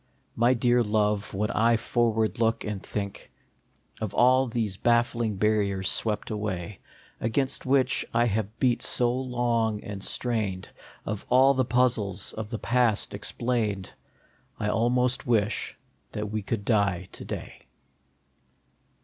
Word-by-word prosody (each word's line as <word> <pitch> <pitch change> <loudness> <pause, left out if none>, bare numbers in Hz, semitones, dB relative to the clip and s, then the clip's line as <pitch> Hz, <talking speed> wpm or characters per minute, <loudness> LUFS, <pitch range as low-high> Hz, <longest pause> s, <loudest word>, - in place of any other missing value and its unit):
My 120 +3 +3
dear 120 0 +3
Love, 105 -2 0
when 105 +2 -1
I 115 +1 +3
forward 110 -2 0
look, 115 0 +1
and 105 -3 -4
think 100 -1 -6 0.7
Of 110 -3 -3
all 130 +2 +4
these 115 -5 -2
baffling 120 -1 +1
barriers 100 -2 +1
swept 110 0 -1
away, 105 -2 -4 0.4
Against 130 +4 0
which 135 -1 +3
I 120 +1 +3
have 110 0 -2
beat 125 -1 +2
so 120 -1 +2
long 120 -4 -1
and 100 -1 -7
strained, 105 -7 -1 0.4
Of 105 -1 -4
all 130 +2 +6
the 130 -1 +1
puzzles 115 -5 +1
of 110 -1 -6
the 115 - -3
past 115 -2 +1
explained, 110 -6 -1 0.7
I 105 - -1
almost 125 +4 +1
wish 110 -2 0 0.4
that 105 -1 -4
we 110 0 -2
could 100 0 -3
die 100 -5 +1
to - - -10
day. - - -8
110 Hz, 130 wpm, -27 LUFS, 105-120 Hz, 0.7 s, all